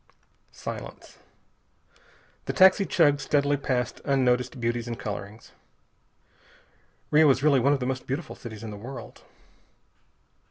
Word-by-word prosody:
Silence. - - -9 1.3
The - - -3
taxi 190 +1 +5
chugged 145 -4 +3
steadily 145 +1 +1
past 125 -3 -2
unnoticed 125 -2 +1
beauties 120 0 -2
and 120 -1 -4
colorings. 105 +1 -7 1.6
Rio 150 0 +6
is 135 0 +2
really 145 -3 +4
one 140 +4 +3
of 140 - 0
the 125 - -3
most 130 0 -3
beautiful 145 +4 -4
cities 110 -4 -10
in 110 - -6
the 105 - -8
world. 125 +6 -9
130 Hz, 125 wpm, -26 LUFS, 120-145 Hz, 1.6 s, Rio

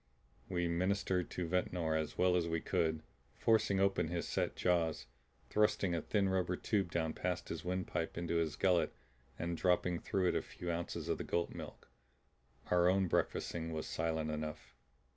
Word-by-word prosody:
We 90 -2 0
ministered 90 +1 0
to 90 -2 -3
Ventnor 85 -2 0
as 80 -1 -2
well 90 0 +4
as 85 -2 +2
we 80 0 0
could; 80 -1 0 0.3
forcing 110 -3 +3
open 95 -4 +2
his 85 +1 -2
set - - -1
jaws, 80 -7 +1 0.5
thrusting 105 -3 +2
a 85 - 0
thin 100 -2 +1
rubber 90 -1 +1
tube 95 -2 0
down 80 -2 0
past 90 -1 -2
his 80 - -4
windpipe 90 -2 -2
into 85 0 0
his 80 -3 0
gullet 90 -3 +2 0.4
and 85 0 -2
dropping 90 0 +2
through 95 -2 +1
it - - 0
a - - +2
few 90 -1 -5
ounces 85 0 -3
of - - 0
the - - -2
goat 85 0 -1
milk. - - -9 0.8
Our 90 0 +5
own 95 0 +3
breakfasting 80 -1 -1
was 80 - -3
silent 80 -1 -1
enough. 75 0 -5
85 Hz, 170 wpm, -35 LUFS, 80-90 Hz, 0.8 s, Our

